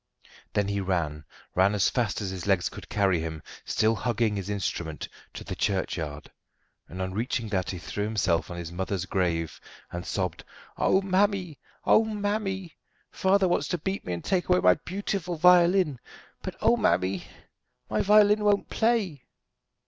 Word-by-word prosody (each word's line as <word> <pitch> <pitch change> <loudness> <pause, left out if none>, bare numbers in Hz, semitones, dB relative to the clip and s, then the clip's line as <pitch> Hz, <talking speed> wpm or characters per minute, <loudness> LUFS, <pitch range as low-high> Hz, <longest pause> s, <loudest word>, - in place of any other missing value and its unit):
Then 105 -2 +1
he 100 0 -1
ran 80 -6 -2 0.3
ran 95 +3 +3
as 100 - +3
fast 115 -5 0
as 95 -2 -3
his 95 0 -6
legs 95 -3 +2
could - - -11
carry 95 -4 +2
him, 80 -1 -5 0.2
still 110 +1 +2
hugging 115 -1 0
his 100 -1 -4
instrument 85 -6 -3 0.3
to - - -6
the - - -5
churchyard; 80 -7 -2 0.6
and 90 - -9
on 95 0 -4
reaching 115 +1 -2
that 95 -3 -1
he 95 - -4
threw 105 +4 -4
himself 100 -6 0
on 85 - -6
his 85 -1 -6
mother's 95 +1 -2
grave 85 -4 -1 0.3
and 85 0 -5
sobbed: 90 -4 -3 0.3
"Oh, 190 - +2
mammy, 190 -5 +1 0.3
mammy! 205 -4 +1 0.4
father 190 0 +3
wants 160 -5 +1
to 175 - -1
beat 190 +5 -3
me 90 - -3
and 85 - -5
take 185 -2 0
away 180 0 +5
my - - +6
beautiful 185 -2 -3
violin 175 -3 +5 0.4
but - - -5
oh, - - +5
mammy! 95 +1 +1 0.6
my - - 0
violin 210 +1 +5
won't 205 -1 +2
play." 215 - 0
105 Hz, 160 wpm, -27 LUFS, -, 0.6 s, my